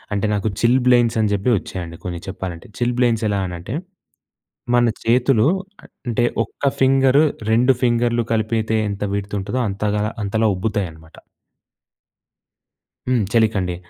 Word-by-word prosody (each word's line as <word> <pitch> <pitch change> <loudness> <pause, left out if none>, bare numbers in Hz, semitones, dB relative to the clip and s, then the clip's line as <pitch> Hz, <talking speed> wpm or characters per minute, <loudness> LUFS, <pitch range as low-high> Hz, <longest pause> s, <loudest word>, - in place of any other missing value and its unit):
అంటే 100 - 0
నాకు 105 +1 -1
చిల్‌బ్లెయిన్స్ 120 -1 +3
అని 105 -1 +1
చెప్పి 100 +5 0
వచ్చాయండి 85 -3 -7
కొన్ని 85 -1 -4
చెప్పాలంటే. 90 -3 -6
చిల్‌బ్లెయిన్స్ 120 -2 +1
ఎలా 100 -1 0
అనంటే 90 +7 -6 1.0
మన 120 0 +4 0.2
చేతులు 120 0 +3 0.4
అ - - -15 0.2
అంటే 120 0 +1 0.2
ఒక్క - - -16 0.2
ఫింగర్ 135 +1 +4 0.3
2 125 +4 +4
ఫింగర్‌లు 120 -1 +2
కలిపితే 110 0 0
ఎంత 100 0 -4
విడ్త్ 100 +1 -4
ఉంటదో 100 +6 -3
అంతగా 105 +1 -1 0.2
అంతలా 110 +2 +1
ఉబ్బుతాయన్నమాట. 90 -6 -4 1.9
హ్మ్. 125 -3 +2
చలికండి. 105 -6 +2
110 Hz, 120 wpm, -20 LUFS, 100-120 Hz, 1.9 s, మన